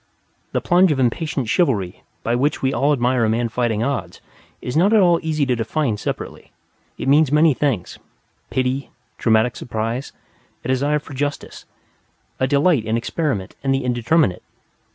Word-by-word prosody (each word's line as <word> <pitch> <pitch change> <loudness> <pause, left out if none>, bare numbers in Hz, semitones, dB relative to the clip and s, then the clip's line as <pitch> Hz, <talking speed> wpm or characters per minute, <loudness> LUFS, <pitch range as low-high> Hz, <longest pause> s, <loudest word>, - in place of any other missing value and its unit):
The - - -1
plunge 180 0 +4
of 140 - 0
impatient 135 +1 -1
chivalry 105 - 0 0.2
by 115 - 0
which 140 +4 0
we 130 +1 +1
all 145 +2 +2
admire 125 -3 +2
a 110 - +2
man 115 +1 0
fighting 115 -2 0
odds 115 -11 -3 0.4
is 125 - -5
not 190 +7 +4
at 220 - +6
all 175 -3 +4
easy 155 -3 0
to 125 -2 +1
define 120 +2 -1
separately, - - -6 0.5
it - - -5
means 145 0 +4
many 150 +1 +5
things, 130 -9 -2 0.5
pity, 130 +1 -1 0.3
dramatic 110 +1 +2
surprise, 115 +2 -4 0.5
a - - -3
desire 140 +3 +1
for 145 -1 -9
justice, 145 +2 -4 0.7
a 130 - +2
delight 145 -1 +3
in 110 +1 0
experiment 115 - -2
and 135 -1 +2
the 135 - -2
indeterminate. 120 - +1
130 Hz, 160 wpm, -20 LUFS, 115-150 Hz, 0.7 s, at